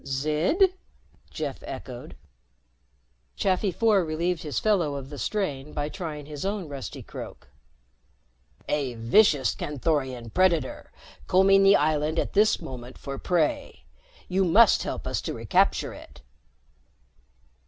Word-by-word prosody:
"Zid?" 155 - +1 0.6
Jeff - - -5
echoed. - - -8 1.2
Chafi 195 -1 +1
Four 210 0 +3
relieved 165 +2 -1
his 150 -2 -4
fellow 180 -9 +1
of 135 0 -7
the 145 - -7
strain 150 -9 -3
by 145 0 -2
trying 150 -3 -6
his 145 -1 -7
own 195 -3 -2
rusty 140 -3 -7
croak. - - -10 1.2
"A 140 -5 -1
vicious 135 - +3
Canthorian 130 -5 -2
predator, 185 -1 +1 0.4
combing 195 +1 +5
the 195 +1 +6
island 155 +1 +1
at - - -1
this 210 +2 +4
moment 130 -6 -9
for 140 -1 -7
prey. 170 -4 -1 0.4
You 190 +1 +1
must 200 +5 +5
help - - -4
us - - -2
to - - -4
recapture - - +1
it." - - -14
155 Hz, 120 wpm, -26 LUFS, 140-190 Hz, 1.2 s, the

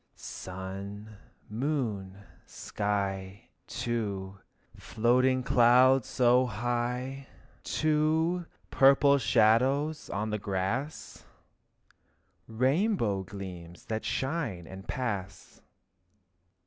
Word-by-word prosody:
Sun 95 +3 -7
and 110 - -14 0.4
moon 115 -10 -2
and 100 -1 -21
sky, 100 -2 -3 0.2
too, 100 -5 -3 0.4
Floating 125 +3 +1
clouds 125 +2 +5
so 125 0 +3
high, 120 +4 -3 0.4
too, 160 +3 +1 0.2
Purple 140 +1 +5
shadows 130 +6 +2
on 105 +2 -2
the 105 - -2
grass, 100 +10 -3 1.2
Rainbow 130 - +1
gleams 90 -3 -9
that 110 0 -3
shine 130 - -2
and 95 +2 -11
pass. 105 -8 -5
115 Hz, 80 wpm, -29 LUFS, 100-135 Hz, 1.2 s, clouds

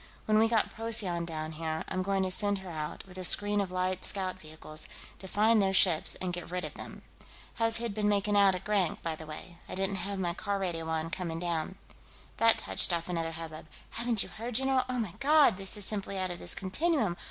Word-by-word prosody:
"When 215 0 +3
we 225 - +5
get 225 -2 +1
Procyon 215 -7 -1
down 155 -1 -5
here, 160 0 -4
I'm 185 - -2
going 195 0 0
to 185 - -2
send 205 +1 +1
her 190 -2 -9
out, 155 -2 -6
with 185 -1 -11
a - - -4
screen 205 +3 +6
of 195 - -3
light 185 0 -1
scout 190 -2 -1
vehicles, 155 -1 -4 0.3
to 190 - -8
find 215 +3 +3
those 195 0 +1
ships 170 -5 +4
and 180 -1 -4
get 175 -1 -6
rid 180 -1 -3
of 150 - -7
them.... - - -10 0.5
How's 225 0 +2
Hid 230 -2 -3
been 210 0 0
making 205 0 +1
out, 200 -2 +5
at 180 - -6
Grank, 200 -5 0
by 165 -1 -2
the 160 0 -11
way? 170 +3 -9
I - - -5
didn't 195 +1 -1
have 195 +2 -4
my 175 -2 -1
car 200 +3 -3
radio 170 -4 -3
on, 160 0 -2
coming 165 -2 -3
down." 170 +1 -3 0.6
That 230 0 +5
touched - - +3
off 170 0 -2
another 165 -2 -2
hubbub: 160 -1 -8 0.2
"Haven't 235 -3 +1
you - - -9
heard, 230 +2 -7
general?"... 265 +1 +3
"Oh, 250 - -2
my 215 -7 -3
God, 290 -5 +5
this 195 +1 +2
is 205 - +6
simply 200 -2 -1
out 185 -1 -2
of 175 - -6
this - - +1
continuum!" 215 - 0
190 Hz, 230 wpm, -30 LUFS, 170-210 Hz, 0.6 s, screen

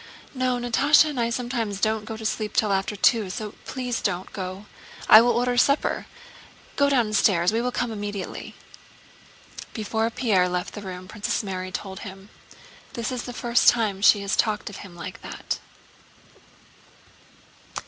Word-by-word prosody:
"No, 255 -2 0
Natásha 280 +6 +4
and 270 - -4
I 230 0 +1
sometimes 235 -4 -2
don't 220 0 0
go 220 0 -6
to 220 - -8
sleep 215 -1 -2
till 215 -5 +2
after 195 +2 -1
two, 210 0 +3
so 210 +3 -5
please 250 -2 -3
don't 185 -1 -2
go. 190 +1 -6 0.4
I 215 - +10
will 240 - +3
order 245 +1 +1
supper. 280 +4 +2 0.7
Go 280 0 +3
downstairs, 210 -8 +3
we 230 - +1
will 250 +1 -1
come 245 -1 -2
immediately." 205 -2 -6 1.2
Before 220 +1 -1
Pierre 220 -7 +2
left 180 0 -3
the 205 - -7
room 185 -2 -8
Princess 210 +2 -2
Mary 185 -2 -4
told 190 0 -6
him: 195 0 -10 0.6
"This 235 -3 -3
is 250 -2 -4
the 245 - -5
first 240 0 +4
time 210 -5 0
she 205 0 +6
has 200 0 -1
talked 210 -2 0
of 200 - -9
him 190 -4 -11
like 170 - -8
that." - - -5
215 Hz, 160 wpm, -24 LUFS, 195-240 Hz, 1.2 s, I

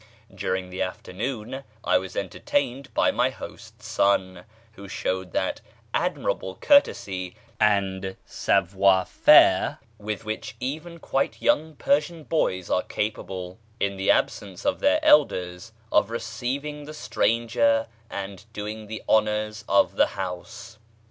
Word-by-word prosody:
During 95 -1 -2
the 90 - -4
afternoon 110 +7 -4 0.2
I 90 +1 +3
was 95 -1 -8
entertained 135 - -2
by - - +4
my - - +2
host's - - -11
son, 95 -2 +1 0.3
who 100 -2 -11
showed 95 -1 -3
that - - -1 0.3
admirable 95 - -1
courtesy 95 - +2 0.2
and 95 -2 +1
savoir 95 0 +2
faire - - +5 0.2
with 105 0 -4
which 110 0 -5
even 155 +7 -5
quite 135 -4 -1
young 155 +1 +1
Persian 175 - 0
boys 95 - 0
are 90 - +2
capable, 95 -2 -4 0.2
in 100 0 0
the 95 0 -1
absence 95 -3 0
of - - +1
their 295 +2 +3
elders, 90 - +3 0.2
of 100 - +3
receiving 130 +6 -4
the 155 +1 -9
stranger 115 -3 +1 0.2
and 100 0 -6
doing 105 +1 -6
the 110 +1 -6
honours 110 0 +1
of 100 - +3
the - - +5
house. 100 +4 -6
105 Hz, 125 wpm, -25 LUFS, 95-125 Hz, 0.3 s, faire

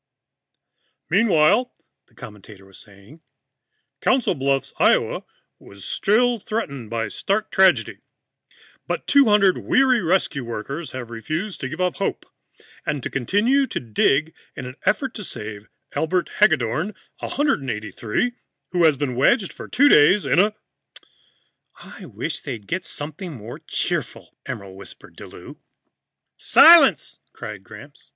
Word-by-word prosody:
"Meanwhile," 215 +3 +3 0.3
the - - -30
commentator 105 -4 -13
was 95 -1 -15
saying, 105 +10 -16 0.8
"Council 260 -6 +2
Bluffs, 135 -2 -1
Iowa, - - +2 0.3
was 100 -1 -13
still 240 +3 +1
threatened 140 - -5
by 115 -1 -2
stark 200 - -2
tragedy. 190 -1 +3 0.9
But - - -3
200 210 -9 +4
weary 255 -3 +2
rescue 165 -6 0
workers 135 +8 -6
have 125 -2 -7
refused 155 - -5
to 130 - -3
give 155 +4 -8
up 180 -1 -1
hope, - - -3 0.6
and 145 -3 -3
continue 225 - +1
to - - -4
dig 135 +7 +1 0.2
in 135 - -7
an 125 +1 -8
effort 265 -2 +1
to 210 - -7
save 105 - -8 0.2
Elbert 175 +3 -1
Haggedorn, 160 - +2 0.2
183, 135 - -2 0.4
who 175 -2 +2
has 155 -3 +4
been 140 -2 -2
wedged 190 - +2
for - - -10
two 280 +3 +3
days 185 - +5
in - - +2
a 210 +2 +3 0.7
..." - - -41
"I - - -12
wish - - -5
he'd 120 -8 -7
get 180 - -4
something 155 +4 -7
more 115 -2 -9
cheerful," - - -4
Emerald 95 -1 -7
whispered 100 - -13
to - - -9
Lou. - - -13 0.8
"Silence!" 340 +1 +6
cried - - -8
Gramps. - - -14
155 Hz, 130 wpm, -22 LUFS, -, 0.9 s, Silence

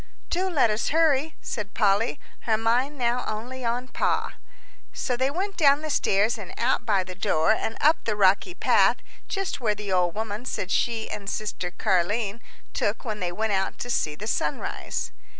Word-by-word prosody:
"Do 370 +2 +1
let 275 -10 +3
us 210 +2 0
hurry," 310 -1 +2
said 210 -3 -5
Polly, 210 +5 +2 0.2
her 220 -2 +1
mind 245 +6 +1
now 245 0 +1
only 245 +4 -5
on 240 +2 -1
Pa. 240 - 0 0.6
So 250 - -2
they 260 +2 +1
went 385 +7 -3
down 285 -2 +5
the 310 - -2
stairs 215 -2 +2
and 190 -3 -8
out 240 0 +1
by 200 -3 +3
the 185 0 -8
door 160 -2 +2
and 220 +1 -1
up 310 +2 +3
the 215 - 0
rocky 205 - +3
path - - +4 0.3
just 390 -8 -3
where 215 -3 +1
the 205 -1 -5
old 180 -2 +2
woman 220 +2 -4
said 195 -6 -3
she 230 -2 0
and 200 -1 -4
sister 210 -5 -3
Car'line 200 +4 0 0.3
took 205 - -1
when 215 -2 -3
they 180 -2 -2
went 215 +3 -1
out 190 0 0
to 245 - -4
see 150 -9 0
the 205 - -7
sunrise. 150 -8 -2
225 Hz, 185 wpm, -26 LUFS, 200-260 Hz, 0.6 s, down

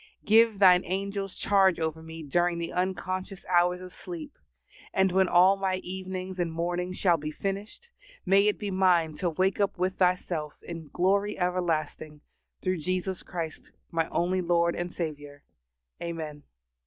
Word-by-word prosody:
Give 225 0 +5
thine 185 -2 +6
angels 195 +1 -3
charge 195 -3 +3
over 160 0 -2
me 160 0 -9
during 175 +4 +1
the 170 0 -4
unconscious 185 +1 -3
hours 180 0 +3
of 185 -1 -10
sleep, 170 -4 -8 0.6
and, 190 -1 +3
when 190 +1 +3
all 180 +3 +6
my 190 -1 0
evenings 185 0 -5
and 170 -2 0
mornings 175 +2 -2
shall 175 -4 +3
be 150 0 -5
finished, 200 - -5 0.3
may 195 +2 +5
it 210 - +2
be 205 -2 -4
mine 180 -4 +3
to 180 - 0
wake 185 +5 0
up 200 -2 +1
with 185 +1 -1
Thyself 180 -4 0
in 165 -2 -7
glory 200 +7 +1
everlasting, 160 -4 -2 0.4
through 185 0 0
Jesus 185 +3 -2
Christ 165 -3 -6 0.2
my 165 -1 0
only 185 +2 0
Lord 170 -1 +2
and 175 0 -3
Saviour. 145 -4 -6 0.6
Amen. 160 -3 -5
180 Hz, 155 wpm, -28 LUFS, 165-190 Hz, 0.6 s, thine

